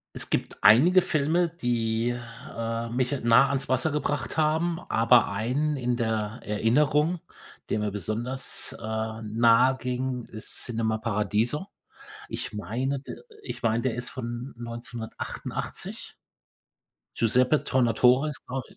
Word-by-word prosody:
Es - - -2
gibt - - -2
einige 135 - +7
Filme, 165 +2 +1
die, 120 -6 -1 0.4
äh, 115 0 -3
mich 125 +2 0
nah 120 +4 +6
ans 140 -1 -2
Wasser 130 +5 +2
gebracht 145 0 -2
haben, 160 +2 +1
aber 115 +1 +5
einen 135 +8 0
in 125 -1 0
der 110 -1 -2
Erinnerung, 150 +10 +2 0.5
der - - +1
mir 105 0 -1
besonders, 115 +7 -2
äh, 110 0 -4
nahe 115 +4 +4
ging, 125 -1 -3
ist 110 - -6
Cinema 110 -2 -1
Paradiso. 110 - 0 0.6
Ich - - -5
meine 125 +6 -2
d 135 - -8 0.3
ich - - -6
meine, 115 +1 +1
der 130 -3 0
ist 125 +1 -4
von 120 +1 -6
1988. 120 -1 -6 1.0
Giuseppe 125 +6 +3
Tornatore 125 +2 +3
ist 145 -4 -5
glau 130 +1 -3
120 Hz, 125 wpm, -27 LUFS, 115-135 Hz, 1.0 s, einige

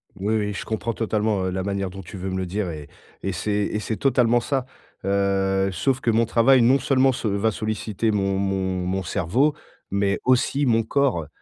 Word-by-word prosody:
Oui, 100 +3 -1
oui, 105 -1 -1
je - - -5
comprends 110 +1 -2
totalement, 105 -3 0
heu, 95 - 0
la 95 0 -2
manière 100 -1 -2
dont 95 +1 -9
tu 95 - -9
veux 95 +1 -4
me 95 - -2
le 95 - -2
dire 95 +1 -2
et 75 -3 -7 0.4
et 95 - -1
c'est 90 +5 -3
et 105 +1 0
c'est 110 0 -3
totalement 120 -3 +3
ça. 130 +1 -2 0.4
Heu, 95 0 +1
sauf 125 +9 0
que 115 - +2
mon 115 +1 +3
travail, 120 +3 +4
non 125 +4 +5
seulement, 135 +1 +3
se 120 - -3
va 100 +2 +1
solliciter 110 0 -2
mon 100 -1 0
mon 95 -2 -1
mon 95 +1 -1
cerveau 105 - +1 0.3
mais 100 0 0
aussi 130 +3 +2
mon 115 -3 +3
corps. 120 - 0
105 Hz, 205 wpm, -23 LUFS, 95-115 Hz, 0.4 s, non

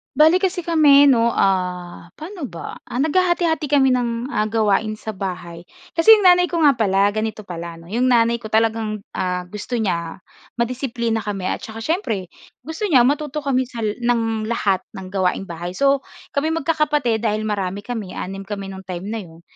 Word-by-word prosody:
Bale 315 +5 +6
kasi 370 -2 -1
kami 290 -4 +6
'no, 235 -2 +3
ah, 180 -2 -1
pa'no 330 -1 -7
ba? 170 -7 -8
Ah, 250 +3 -2
naghahati-hati 340 -1 +1
kami 270 -2 +3
ng, 240 0 -1
ah, 215 -5 0
gawain 215 0 +1
sa 215 +1 -7
bahay, 180 -4 -6 0.2
kasi 340 +7 +7
'yong 420 - +1
nanay 360 -1 +6
ko 340 -2 -1
nga 295 - +7
pala, 200 -2 +3
ganito 215 0 -3
pala 170 -2 -7
'no, 165 +2 -14
'yong 245 +4 +1
nanay 235 -1 +3
ko 235 - -9
talagang, 220 -1 0
ah, 180 -1 -2
gusto 210 +5 -6
niya 175 -6 -2 0.3
madisiplina 235 -1 -1
kami 200 -3 -3
at - - -2
saka 225 0 -8
siyempre 225 - -2 0.3
gusto 320 +9 -4
niya 275 -10 +5
matuto 295 +3 0
kami 260 -2 0
sa 235 -2 -7
la 235 +3 0
ng 225 -2 -1
lahat 200 -4 +1
ng 185 -1 -8
gawaing 190 0 0
bahay. 175 +2 -5
So, 275 +4 +3 0.3
kami 285 +2 0
magkakapatid 295 -7 +1
dahil 215 0 0
marami 200 -2 -2
kami, 215 -5 -5
6 195 +1 -6
kami 200 -1 -5
no'ng 190 -1 -10
time 185 +2 -5
na 225 - -3
'yon, 170 -5 -11
225 Hz, 180 wpm, -21 LUFS, 195-280 Hz, 0.3 s, kasi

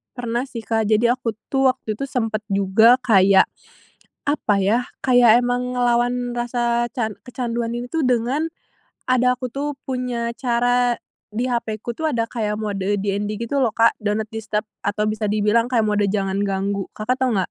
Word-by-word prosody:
Pernah 240 +1 -2
sih, 230 -4 -7
Kak. 220 -1 0
Jadi, 225 +2 +3
aku 230 -3 -2 0.2
tuh, 270 -1 +3
waktu 225 - -6
itu 275 - -2
sempet 225 -4 -1
juga 200 +4 +5
kayak, 195 -4 +5 0.8
apa 285 -7 +1
ya, 225 +6 +2 0.2
kayak 245 -2 +5
emang 245 0 -1
ngelawan 245 0 +1
rasa 240 0 0
can 220 -4 -2
kecanduan 235 -2 -3
ini 240 +1 -4
tuh, 320 +2 -1
dengan 250 +4 +1 0.6
ada, 250 0 +2
aku 255 - -3
tuh, 280 +3 -4
punya 245 -3 -2
cara 245 0 +1 0.3
di 235 +4 -2
hapeku 235 -1 -3
tuh, 315 +4 -1
ada 230 -3 0
kayak 215 -3 -3
mode 205 -3 -3 0.2
DND 205 +1 -2
gitu 260 +4 -1
loh, 235 - +2
Kak, 230 +1 +3
do 210 - 0
not 220 - -3
disturb, 220 0 -3 0.2
atau 210 +1 -1
bisa 215 -1 -1
dibilang 215 +3 +2
kayak 230 -4 +2
mode 210 0 +1
jangan 195 -1 -1
ganggu. 195 0 -2
Kakak 215 +4 -1
tahu, 245 -6 +2
nggak? 185 - -1
235 Hz, 170 wpm, -21 LUFS, 215-245 Hz, 0.8 s, juga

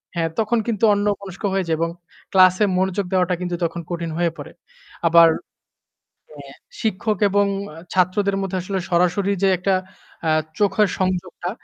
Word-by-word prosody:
হ্যাঁ 165 -1 0
তখন 225 +2 +1
কিন্তু 225 -1 -2
অন্যমনস্ক 200 -1 -2
হয়ে 190 -2 0
যাই 160 - +1
এবং 165 0 0 0.4
ক্লাস 185 -1 +6
এ - - +5
মনোযোগ 190 +1 0
দেওয়াটা 180 -1 +2
কিন্তু 175 -1 -2
তখন 170 +1 -4
কঠিন 170 -1 -3
হয়ে 170 -1 +1
পড়ে। - - -9 0.6
আবার 165 0 +7 1.0
অ্যাঁ 140 -2 -12 0.3
শিক্ষক 215 -1 -1
এবং 205 0 +3 0.5
ছাত্রদের 195 +2 +2
মধ্যে 190 -1 -2
আসলে 190 +1 -3
সরাসরি 180 +3 +2
যে 195 - +5
একটা 190 +1 +1 0.5
অ্যাঁ 155 0 +3 0.2
চোখের 210 0 +3
সংযোগটা, 185 -1 -2
185 Hz, 150 wpm, -21 LUFS, 175-200 Hz, 1.0 s, আবার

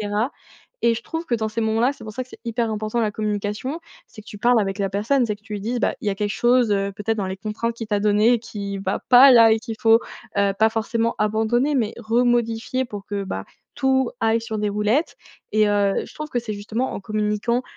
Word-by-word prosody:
cetera. 210 +5 -1 0.5
Et 235 -1 +4
je 230 - -6
trouve 325 +5 -5
que 240 - 0
dans 220 0 -2
ces 230 +2 -3
moments-là 225 +4 +2
c'est 280 - -13
pour 215 - -7
ça 255 - -4
que - - -25
c'est - - -13
hyper 230 -1 -1
important 215 +2 -2
la 215 -2 +1
communication, 210 +8 -3 0.3
c'est 215 - -13
que - - -32
tu 205 - -9
parles 240 +2 +4
avec 195 0 -2
la 195 - 0
personne, 235 +6 +1
c'est 210 -2 -2
que 210 - -33
tu 215 - -11
lui 205 - -4
dises, 240 +4 -2
bah, - - +1
il - - -7
y - - +2
a - - -1
quelque 205 0 -1
chose, 240 -2 +3
heu, 200 0 0
peut-être 220 +2 -2
dans 195 - -1
les 190 +1 -4
contraintes 225 +3 -3
qui 225 -2 -5
t'a 205 -1 0
donné 210 +3 +4
et - - +1
qui 205 -3 -6
va 195 0 -2
pas 260 +2 +9
là 230 -2 +7
et 220 - +2
qu'il 225 -2 -6
faut, 225 -1 +5 0.4
heu, 200 -1 +3
pas 220 0 +4
forcément 230 +1 -1
abandonner 225 +7 +1
mais 225 -4 0
remodifier 240 +1 0
pour 205 -3 -8
que 200 -1 -3
bah, 95 - -5 0.3
tout 265 -2 +1
aille 225 +1 +2
sur 225 -1 -5
des 210 -1 0
roulettes. 210 +10 0 0.4
Et 215 -1 +3
heu, 200 -1 +2
je - - -15
trouve 305 0 -6
que 245 - 0
c'est 220 -3 -5
justement 220 +5 -3
en - - -5
communiquant, 215 +4 -1
220 Hz, 250 wpm, -22 LUFS, 210-240 Hz, 0.5 s, pas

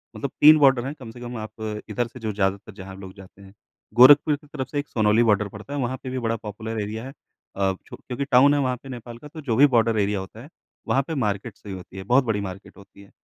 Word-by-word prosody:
मतलब 140 - -4
3 155 +1 +9
बॉर्डर 135 -4 +4
हैं, 135 - -4
कम 120 -4 -9
से 120 - -13
कम 120 0 -6
आप 110 0 -6
इधर 120 +2 -1
से 130 - -13
जो 110 -2 -3
ज़्यादातर 100 +1 -2
जहाँ 95 -1 -10
लोग 95 -1 -10
जाते 95 0 -15
हैं। 95 0 -15 0.4
गोरखपुर 145 +5 +7
की 145 +1 -17
तरफ 140 -3 -5
से 145 - -3
एक 145 - -5
सोनौली 110 +1 +2
बॉर्डर 105 -2 +2
पड़ता 105 +8 -10
है, 145 - -2
वहाँ 130 0 -2
पे 130 - -5
भी 130 0 -3
बड़ा 115 -1 -1
पॉपुलर 110 +1 -6
एरिया 110 +2 -5
है, 135 - -7 0.4
अ, 95 -1 +1
छू - - -10
क्योंकि 130 +2 -5
टाउन 135 +3 +6
है 145 - +2
वहाँ 130 -2 0
पे 135 - -11
नेपाल 120 -2 -8
का, 150 - -12
तो 155 +2 -10
जो 125 -6 -1
भी 140 +5 +7
बॉर्डर 115 -4 +2
एरिया 100 0 0
होता 95 +4 -9
है, 140 - -13 0.4
वहाँ 135 - +2
पे 160 - -3
मार्केट 105 -6 -2
से 105 - -13
ही 95 - -5
होती 95 +1 -11
है, 95 - -6
बहुत 125 +7 +3
बड़ी 110 -4 -1
मार्केट 95 0 -8
होती 100 0 -16
है, 100 - -17
115 Hz, 270 wpm, -24 LUFS, 100-130 Hz, 0.4 s, 3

